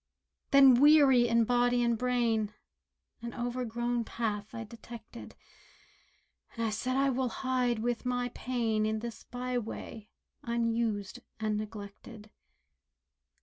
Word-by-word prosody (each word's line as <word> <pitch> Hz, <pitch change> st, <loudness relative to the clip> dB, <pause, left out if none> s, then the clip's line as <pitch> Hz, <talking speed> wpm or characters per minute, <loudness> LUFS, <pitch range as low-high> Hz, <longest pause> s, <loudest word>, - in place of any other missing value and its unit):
Then 270 Hz, -3 st, +7 dB
weary 280 Hz, -5 st, +6 dB
in 230 Hz, 0 st, +3 dB
body 245 Hz, +1 st, +2 dB
and 235 Hz, -1 st, +2 dB
brain, 230 Hz, -3 st, 0 dB, 0.7 s
An 235 Hz, 0 st, -6 dB
overgrown 240 Hz, -1 st, -2 dB
path 220 Hz, -1 st, -4 dB
I 230 Hz, -, -4 dB
detected, 230 Hz, +1 st, -11 dB, 1.2 s
And 230 Hz, -1 st, -1 dB
I 220 Hz, -, 0 dB
said 255 Hz, +5 st, -2 dB
"I 275 Hz, 0 st, +3 dB
will 255 Hz, 0 st, 0 dB
hide 250 Hz, -1 st, 0 dB
with 235 Hz, +2 st, -2 dB
my 245 Hz, -1 st, -1 dB
pain 230 Hz, -4 st, -1 dB
In 220 Hz, 0 st, -1 dB
this 230 Hz, 0 st, -7 dB
byway, 245 Hz, -3 st, -5 dB, 0.3 s
unused 230 Hz, -2 st, -1 dB, 0.2 s
and 215 Hz, -1 st, -1 dB
neglected." 210 Hz, +1 st, -8 dB
235 Hz, 115 wpm, -30 LUFS, 220-245 Hz, 1.2 s, Then